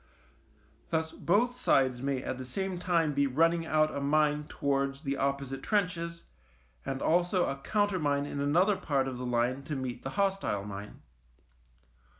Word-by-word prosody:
Thus 160 Hz, 0 st, 0 dB
both 240 Hz, +7 st, +1 dB
sides 130 Hz, -2 st, +3 dB
may 135 Hz, -1 st, -1 dB
at 130 Hz, -, -4 dB
the -, -, -4 dB
same 185 Hz, +8 st, -3 dB
time 170 Hz, -4 st, +1 dB
be 140 Hz, 0 st, +2 dB
running 165 Hz, +4 st, +2 dB
out 155 Hz, 0 st, +2 dB
a 140 Hz, -, -2 dB
mine 150 Hz, +1 st, +2 dB
towards 140 Hz, 0 st, -1 dB
the 140 Hz, -3 st, -2 dB
opposite 140 Hz, -1 st, -2 dB
trenches, 170 Hz, -5 st, -1 dB, 0.6 s
and 135 Hz, 0 st, -3 dB
also 175 Hz, +2 st, +2 dB
a 135 Hz, -, -2 dB
countermine 155 Hz, -5 st, 0 dB
in 145 Hz, -, -5 dB
another 175 Hz, +8 st, +3 dB
part 135 Hz, -3 st, 0 dB
of 130 Hz, -2 st, -5 dB
the 125 Hz, -, -3 dB
line 125 Hz, +2 st, +1 dB
to 150 Hz, -, -3 dB
meet 130 Hz, -2 st, -4 dB
the 135 Hz, -, -4 dB
hostile 195 Hz, -, 0 dB
mine. 100 Hz, 0 st, -8 dB
145 Hz, 155 wpm, -30 LUFS, 135-170 Hz, 0.6 s, sides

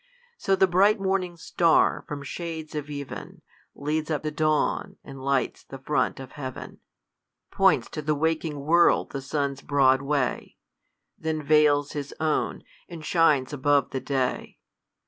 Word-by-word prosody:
So 195 Hz, -, +1 dB
the 190 Hz, -, +4 dB
bright 195 Hz, +4 st, +3 dB
morning 190 Hz, -2 st, -1 dB
star, 165 Hz, 0 st, +2 dB
from 145 Hz, -3 st, -6 dB
shades 160 Hz, +1 st, -6 dB
of 150 Hz, -1 st, -5 dB
ev'n, 140 Hz, -2 st, -8 dB, 0.3 s
Leads 150 Hz, +2 st, -2 dB
up 155 Hz, -2 st, -1 dB
the 155 Hz, -, -2 dB
dawn, 155 Hz, 0 st, 0 dB
and 135 Hz, -1 st, -10 dB
lights 140 Hz, -1 st, 0 dB
the 135 Hz, -, -10 dB
front 135 Hz, +2 st, -1 dB
of 130 Hz, -1 st, -9 dB
heav'n, 130 Hz, -4 st, -8 dB, 0.7 s
Points -, -, +3 dB
to -, -, -4 dB
the 150 Hz, 0 st, 0 dB
waking 160 Hz, -1 st, -1 dB
world 170 Hz, +4 st, +3 dB
the 135 Hz, -, -4 dB
sun's 140 Hz, 0 st, -2 dB
broad 135 Hz, -2 st, +3 dB
way, 140 Hz, -2 st, -2 dB, 0.6 s
Then 160 Hz, -1 st, -2 dB
v^ils 145 Hz, -1 st, +3 dB
his 145 Hz, -1 st, -5 dB
own, 155 Hz, -1 st, -1 dB, 0.3 s
and 165 Hz, -3 st, -9 dB
shines 155 Hz, -5 st, +2 dB
above 145 Hz, -1 st, +2 dB
the 130 Hz, -, -3 dB
day. 130 Hz, -3 st, -2 dB
150 Hz, 145 wpm, -26 LUFS, 140-160 Hz, 0.7 s, the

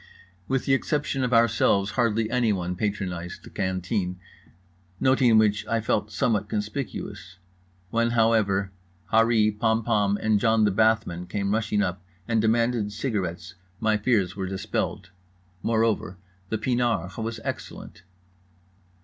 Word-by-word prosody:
With 135 Hz, -1 st, 0 dB
the 135 Hz, -, +2 dB
exception 140 Hz, -1 st, 0 dB
of 125 Hz, -, 0 dB
ourselves 115 Hz, -4 st, +3 dB
hardly 115 Hz, -2 st, +1 dB
anyone 100 Hz, -8 st, 0 dB
patronized 90 Hz, -4 st, -4 dB
the -, -, -13 dB
canteen, 95 Hz, -1 st, -2 dB, 0.8 s
noting 130 Hz, -3 st, +4 dB
which 105 Hz, -1 st, +3 dB
I 115 Hz, -, +1 dB
felt 105 Hz, -1 st, -1 dB
somewhat 105 Hz, -3 st, 0 dB
conspicuous. 105 Hz, -5 st, -5 dB, 0.5 s
When, 115 Hz, 0 st, +2 dB
however, 110 Hz, -4 st, +2 dB, 0.4 s
Harree 110 Hz, -1 st, +4 dB
Pompom 110 Hz, -2 st, +1 dB
and 110 Hz, -1 st, +2 dB
John 110 Hz, 0 st, +3 dB
the 105 Hz, -, +3 dB
Bathman 105 Hz, -4 st, +1 dB
came 100 Hz, 0 st, -1 dB
rushing 105 Hz, -2 st, +1 dB
up 90 Hz, -1 st, -3 dB, 0.2 s
and 115 Hz, -2 st, +2 dB
demanded 115 Hz, -1 st, +1 dB
cigarettes 90 Hz, -7 st, -3 dB, 0.3 s
my 110 Hz, -1 st, +2 dB
fears 105 Hz, -4 st, +1 dB
were 95 Hz, -1 st, -3 dB
dispelled. 95 Hz, -1 st, -3 dB, 0.5 s
Moreover 110 Hz, -4 st, 0 dB, 0.3 s
the 110 Hz, -, -1 dB
pinard 115 Hz, -6 st, 0 dB
was 115 Hz, 0 st, -3 dB
excellent. -, -, -7 dB
110 Hz, 125 wpm, -25 LUFS, 100-115 Hz, 0.8 s, noting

